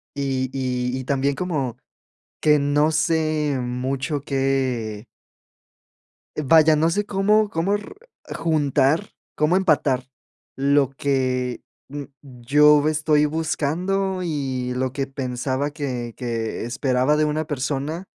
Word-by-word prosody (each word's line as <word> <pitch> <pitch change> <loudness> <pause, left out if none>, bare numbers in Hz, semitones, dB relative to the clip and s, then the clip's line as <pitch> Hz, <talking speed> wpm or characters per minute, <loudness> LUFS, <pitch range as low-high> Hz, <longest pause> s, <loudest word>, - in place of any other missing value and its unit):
y 135 -2 -1
y 125 -1 -2
y 130 - -4
también 140 +1 0
como, 150 -9 -2 0.6
que 150 -1 +4
no 145 +2 +2
sé 155 -2 +1
mucho 130 +4 -2
que 130 -6 -1 1.4
vaya, 155 +2 +6
no 160 +2 +2
sé, 205 +4 -1
cómo 210 +2 +2
cómo 190 +2 0
r 205 - -9 0.4
juntar, 150 +2 +1 0.3
cómo 155 +4 +2
empatar, 145 -8 +2 0.5
lo 140 0 +2
que 130 -3 -1 0.3
n 145 0 -7
yo 145 +3 +3
estoy 150 -1 +2
buscando, 170 +5 -1
y 135 -6 -2
lo 130 0 -1
que 135 0 -2
pensaba 130 +1 -3
que 130 -6 -4
que 115 -4 -3
esperaba 130 +3 +1
de 155 - +2
una 150 +1 -1
persona, 145 +4 -3
140 Hz, 115 wpm, -22 LUFS, 130-155 Hz, 1.4 s, vaya